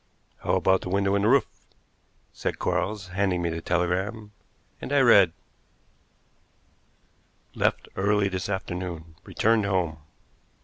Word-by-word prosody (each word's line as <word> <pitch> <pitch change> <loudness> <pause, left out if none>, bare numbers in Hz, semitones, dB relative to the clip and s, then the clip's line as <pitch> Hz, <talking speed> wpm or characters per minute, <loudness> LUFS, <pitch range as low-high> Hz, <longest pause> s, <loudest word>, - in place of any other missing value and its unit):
"How - - 0
about 95 0 +3
the - - -6
window 100 +1 +1
in 100 - +2
the 105 - +2
roof?" 135 +3 +4 0.9
said - - -3
Quarles, 100 -3 -2
handing 90 -2 0
me 85 - 0
the 80 0 -4
telegram, 95 +6 -1 0.5
and - - -6
I 145 - +4
read: 100 -8 +6 2.2
"Left - - 0
early 100 +1 +2
this 95 0 -4
afternoon; 90 -4 -5
returned 110 -1 +1
home." 90 -5 -1
95 Hz, 125 wpm, -26 LUFS, 90-105 Hz, 2.2 s, read